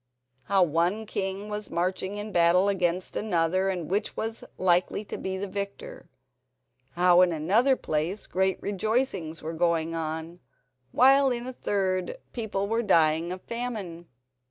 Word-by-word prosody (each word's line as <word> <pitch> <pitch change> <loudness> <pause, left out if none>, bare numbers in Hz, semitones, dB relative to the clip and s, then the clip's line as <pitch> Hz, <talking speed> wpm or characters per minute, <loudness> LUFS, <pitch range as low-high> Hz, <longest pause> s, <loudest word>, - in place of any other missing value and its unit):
How 195 -1 +4
one 175 +7 0
king 195 0 -3
was 210 -1 -5
marching 185 +3 -2
in 210 +1 -5
battle 175 +2 +4
against 180 -2 -1
another, 185 -1 +1
and 180 -4 -3
which 205 +3 -2
was 225 +1 -3
likely 185 +3 +1
to - - -6
be 190 0 -4
the 195 - -3
victor. 200 +1 -6 0.8
How, 180 +1 +5
in 180 -1 +4
another 205 - +3
place, 165 +1 -2
great 190 0 0
rejoicings 200 -5 -1
were 160 +1 -4
going 165 -1 0
on, 160 +1 -4 0.5
while 270 +2 +5
in 240 -1 -2
a 255 - -6
third 185 -5 -1 0.2
people 200 -4 -2
were 225 +2 +1
dying 165 -4 +3
of 185 0 -6
famine. 215 -8 -5
190 Hz, 145 wpm, -27 LUFS, 170-210 Hz, 0.8 s, How